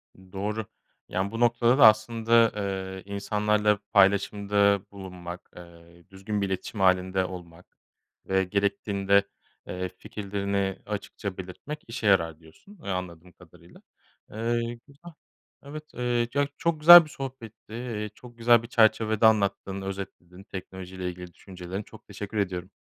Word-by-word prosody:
I 95 -1 -19
doğru. 105 +3 -3 0.4
Yani, 95 +2 -2
bu 115 - -5
noktada 120 +1 +3
da 125 - +9
aslında, 115 +1 +4
eee, 95 -2 -4
insanlarla 105 +1 +1
paylaşımda 100 0 +3
bulunmak, 90 -3 -9
eee, 85 0 -15
düzgün 100 +2 -4
bir 100 - 0
iletişim 95 +3 -5
hâlinde 95 0 +2
olmak 90 -1 -11 0.5
ve 95 0 +1
gerektiğinde, 100 0 +1 0.4
eee, 90 0 -4
fikirlerini 100 -1 -3
açıkça 100 -2 -5
belirtmek 95 +12 -7
işe 115 -2 -3
yarar 85 -5 +2
diyorsun, 85 - -18
eee, - - -6
anladığım 90 -2 -5
kadarıyla. - - -19 0.5
Eee, 115 +1 -2
güzel, 150 +5 -14 0.5
evet, 150 +2 -8
eee, 120 -1 0
ya 140 0 +1
çok 170 -2 0
güzel 170 +2 +11
bir - - -13
sohbetti, 130 -6 -9
eee, 115 -3 -4
çok 120 -1 -15
güzel 115 0 +4
bir - - -8
çerçevede 110 -2 +3
anlattın, 100 -2 +2
özetledin 95 -1 -8
teknoloji 95 -1 -9
ile 90 -1 -3
ilgili 90 0 -9
düşüncelerini. 95 +1 -8
Çok 110 - -16
teşekkür 105 +1 -7
ediyorum. 90 -2 -2
100 Hz, 135 wpm, -26 LUFS, 95-115 Hz, 0.5 s, güzel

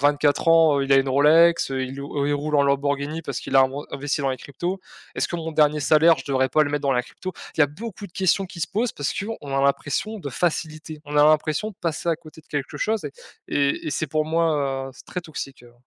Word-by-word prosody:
à - - -5
24 145 +1 +2
ans, 160 -3 +5
heu, 135 - +1
il 135 - +1
a - - +7
une 135 0 +3
Rolex, 155 +4 +4
heu, 130 0 -1
il 130 +2 -5
ou 140 0 -3
il 145 - +1
roule 150 +1 -2
en 140 - +5
Lamborghini 140 +2 0
parce 140 -5 -4
qu'il - - -1
a 135 - +8
inven 130 +2 -1
investi 140 +1 -2
dans 135 -1 0
les 130 - -2
cryptos. 175 +9 -5 0.4
Est - - -3
ce - - +2
que - - -5
mon 165 -1 -4
dernier 150 -1 +3
salaire, 160 +3 +5
je - - -8
devrais 130 -1 +1
pas 155 +4 +3
le 145 - -1
mettre 145 0 -2
dans 140 -1 +2
la 125 -1 +1
crypto?» 185 +8 -8 0.2
Il - - 0
y - - +9
a - - -1
beaucoup 205 +7 -8
de 175 - -20
questions 190 +1 +1
qui 180 -2 -10
se - - -1
posent 230 +4 -1
parce 145 - -2
qu'on 200 -9 -5
a - - +2
l'impression 145 +10 0
de 145 - -5
facilité, 155 0 -3
on 150 0 -5
a 145 - +7
l'impression 155 +6 +2
de - - -15
passer 165 0 -2
à 165 - +3
côté 160 -1 -15
de - - -33
quelque 145 -2 -4
chose 220 0 -1
et - - -7 0.4
et 140 -1 0
et - - -2
c'est 155 - -1
pour 155 +2 0
moi, 150 -5 0
heu, - - -9
c'est 135 - -15
très 180 - -4
toxique, 140 -6 -8
heu. 120 - -17
150 Hz, 275 wpm, -23 LUFS, 140-165 Hz, 0.4 s, y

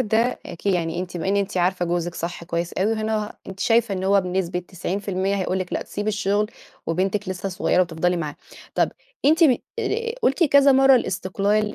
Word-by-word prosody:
ده 230 +1 +1
أكي 185 +3 -2
يعني 170 -1 -1
أنتِ 180 -1 -5
بما 175 +2 -2
إن 200 - +2
أنتِ 200 -1 -1
عارفة 180 0 +1
جوزِك 175 0 -2
صح 170 0 -5
كويس 170 0 -3
أوي 205 +4 +1
وهنا 215 -1 -2
أنتِ 195 0 -9
شايفة 230 -2 +3
إن 185 0 -3
هو 200 +1 +4
بنسبة 180 -1 -2
90% 190 +2 -2
هيقول 190 -1 -1
لكِ 185 -1 -5
لأ، - - -1
تسيبي 205 +1 -4
الشُغل 210 0 0 0.4
وبنتِك 190 +4 -1
لسّه 185 +1 -3
صغيرة 185 0 +1
وتفضلي 175 +1 0
معاها. 150 -4 -4 0.4
طب - - +2 0.3
أنتِ 320 +4 +5
ب 260 -6 +5 0.2
آآ 465 +1 -1
قُلتِ 335 +3 +3
كذا 280 -2 +6
مرّة 270 0 +6
الاستقلال 205 +1 0
195 Hz, 190 wpm, -23 LUFS, 180-215 Hz, 0.4 s, كذا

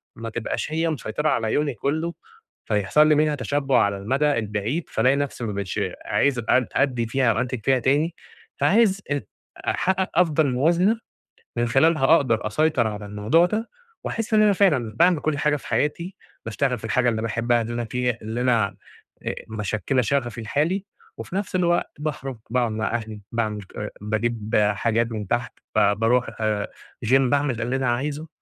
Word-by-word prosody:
ما 115 0 -6
تبقاش 120 +6 -3
هي 165 +1 0
مسيطرة 150 +1 -2
على 110 -2 0
يومي 145 -2 +1
كُلّه، 160 +8 -2 0.5
فيحصل 105 +9 +3
لي 155 - +5
منها 150 0 +2
تشبُّع 135 -1 +1
على 100 -1 0
المَدى 135 +9 +1
البعيد، 110 +9 -3
فالاقي 130 +5 +2
نَفْسي 140 -3 -3
ما 105 - -3
بقيتش 100 -3 -3 0.3
عايز 140 -3 +1
أد 130 -2 +4
أدّي 125 -4 +1
فيها 125 0 +2
أو - - -1
أنتِج 125 -1 -2
فيها 135 -1 +3
تاني، 145 +7 +1 0.4
فعايز 200 -2 +3
ات 145 -1 -2 0.4
أحقّق 190 0 +1
أفضل 160 -4 +3
موازنة 175 - +2 0.6
من 120 0 +1
خلالها 135 +3 +3
أقدر 115 -9 +1
أسيطر 140 0 +2
على 105 -1 -5
الموضوع 105 +12 +2
ده 215 +5 -2 0.4
وأحِس 225 0 -3
إن 215 - +6
أنا 210 -1 +5
فعلًا 145 - +2
باعمل 175 +3 +4
كل 155 -2 0
حاجة 150 0 +2
في - - -8
حياتي، 170 +6 -1 0.3
باشتغل 125 +3 0
في 110 - -8
الحاجة 125 +3 +2
اللي 110 -1 -1
باحبّها 115 +2 +1
اللي 120 +1 -5
أنا 120 0 -2
في 125 +2 0
اللي 110 +3 -3
أنا 120 -4 +3 0.6
آآ - - -3
مِشكِّلة 110 +4 -1
شَغَفي 120 -2 -1
الحالي 155 - 0 0.3
وفي - - -7
نَفْس 195 -1 -2
الوقت 175 -1 +1
باخرُج، 135 -4 -4
باقعُد 120 -3 +1
مع 110 0 -2
أهلي، 110 -2 -5
باعمل 110 -3 -2
ك 105 +2 -7
باجيب 110 +1 -2 0.2
حاجات 115 +2 0
من 105 -3 -4
تحت، 120 +3 -1 0.2
ب - - +7 0.2
باروح 120 +2 +2
آآ 105 -2 0 0.4
gym، 115 - +1
باعمل 135 -2 +1
اللي 120 +3 -1
أنا 135 -2 0
عايزه، 145 +6 -2
125 Hz, 175 wpm, -23 LUFS, 115-150 Hz, 0.6 s, ب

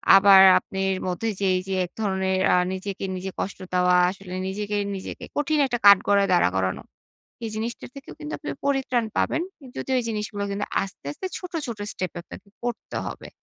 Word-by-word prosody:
আবার 195 0 +8 0.2
আপনার 190 0 -2
মধ্যে 180 +5 -2
যে 200 - 0
এইযে 190 +1 -4
এক - - -13
ধরনের 190 -2 0
আ - - +6 0.2
নিজেকে 195 +1 -5
নিজে 190 +1 -5
কষ্ট 195 - -3
দেওয়া 180 0 +4
আসলে 190 -1 -8
নিজেকে 205 +2 -3 0.2
নিজেকে 190 - -7
কঠিন 295 +1 +1
একটা 240 -2 -1
কাঠগড়ায় 200 0 +6
দাঁড়া 175 - +4
করানো। 95 0 0 0.6
এই 225 - -3
জিনিসটির 230 +3 -4
থেকেও 275 -1 -10
কিন্তু 300 -1 -7
আপনি - - -8 0.2
পরিত্রাণ 265 -4 +1
পাবেন। 325 - +1 0.2
উম 265 - -11
যদিও 265 - -2
এই - - -6
জিনিসগুলো 210 -2 -3
কিন্তু 200 +1 -2 0.2
আস্তে, 190 -5 -9
আস্তে 375 - -6
ছোট, 360 -1 -9
ছোট 235 -3 -5
স্টেপ 185 -2 -3
এ - - -2
আপনাকে 200 - -12
করতে 240 -2 -4
হবে। - - -7
200 Hz, 185 wpm, -24 LUFS, 190-235 Hz, 0.6 s, আবার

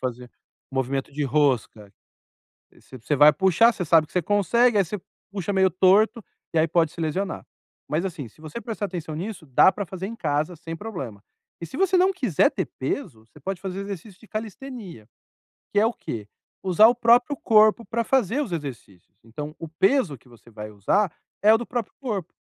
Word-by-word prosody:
fazer 125 -1 -5 0.4
movimento 135 +1 -2
de 145 +1 -3
rosca. 125 -7 0 0.8
V 130 - -14
você 145 +6 -1
vai 150 +2 +8
puxar, 190 +5 +4
você 180 - -4
sabe 160 0 +5
que - - -23
você 180 - +2
consegue, 205 +6 +3
aí 200 - +5
você 210 +4 -5 0.3
puxa 200 0 -3
meio 190 0 +4
torto, 205 +6 +3 0.3
e 160 - +3
aí 160 - +3
pode 165 -1 +2
se - - -13
lesionar. 185 +5 -2 0.4
Mas 155 +4 0
assim, 160 -8 -5
se 115 - -21
você 155 +8 -7
prestar 215 -2 -4
atenção 170 -5 -6
nisso, 185 0 -6
dá 135 +7 +5
para 205 - -5
fazer 190 +1 -6
em 230 - -7
casa 155 -4 -1
sem 165 +1 -7
problema. 135 - -7 0.4
E - - -4
se 265 - -9
você 380 0 +2
não 370 +2 +4
quiser 245 - +2
ter - - -2
peso, 130 - -4
você 120 +6 -19
pode 190 +5 -5
fazer 190 -1 -5
exercício 200 0 -8
de 225 - -18
calistenia. 215 - -7 0.7
Que 205 - +3
é 220 - +4
o 230 - 0
quê? 105 - -7 0.3
Usar 190 +3 +6
o 240 - +3
próprio 245 +4 +4
corpo 215 -1 +4
para 230 0 -1
fazer 260 +2 +1
os 230 -11 -6
exercícios. 125 - -7
Então 145 +7 -7
o 165 - -6
peso 185 - +1
que 125 - -24
você 120 -1 -18
vai 105 -1 -8
usar 165 - +1 0.3
é 210 +1 +7
o - - +3
do 240 - -6
próprio 240 -4 -4
corpo, 210 - -4
180 Hz, 200 wpm, -24 LUFS, 145-215 Hz, 0.8 s, vai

